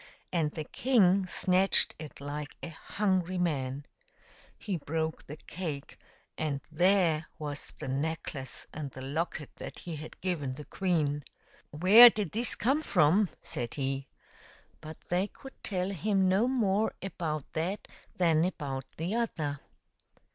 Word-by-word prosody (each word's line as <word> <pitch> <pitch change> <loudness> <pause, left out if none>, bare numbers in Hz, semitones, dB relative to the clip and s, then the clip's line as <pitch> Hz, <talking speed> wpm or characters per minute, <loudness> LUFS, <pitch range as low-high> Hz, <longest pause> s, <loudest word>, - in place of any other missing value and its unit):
And 165 -4 +2
the 155 +1 -5
king 195 - +3
snatched 185 +1 +4
it 155 -2 -9
like 145 +1 -6
a - - -4
hungry 185 +1 -1
man. 140 -5 -1 0.7
He 200 -5 -3
broke 160 +1 -3
the 150 - -7
cake, 155 -4 -6 0.4
and 150 -3 -1
there 170 -2 +3
was 145 -1 -5
the - - -6
necklace 140 -1 -3
and 150 -2 -5
the 130 0 -9
locket 150 +1 -3
that - - -8
he 165 -3 -6
had 155 +2 -9
given 150 -8 -2
the 150 +1 -9
queen. 155 -6 0 0.3
" - - -29
Where 195 +10 +9
did 210 -6 -3
this 235 +2 +2
come 270 +7 +1
from 185 - +3
?" - - -40
said 120 -1 -5
he. 135 -1 -2 0.7
But 155 +1 -8
they 180 +3 +1
could 270 +5 -13
tell 185 -1 -1
him 195 +1 +1
no 195 +6 +3
more 220 -5 +1
about 160 -6 -4
that 175 +6 -2 0.3
than 165 -3 +4
about 140 -7 -3
the 170 +6 -2
other. 160 -12 -1
165 Hz, 145 wpm, -30 LUFS, 150-190 Hz, 0.7 s, Where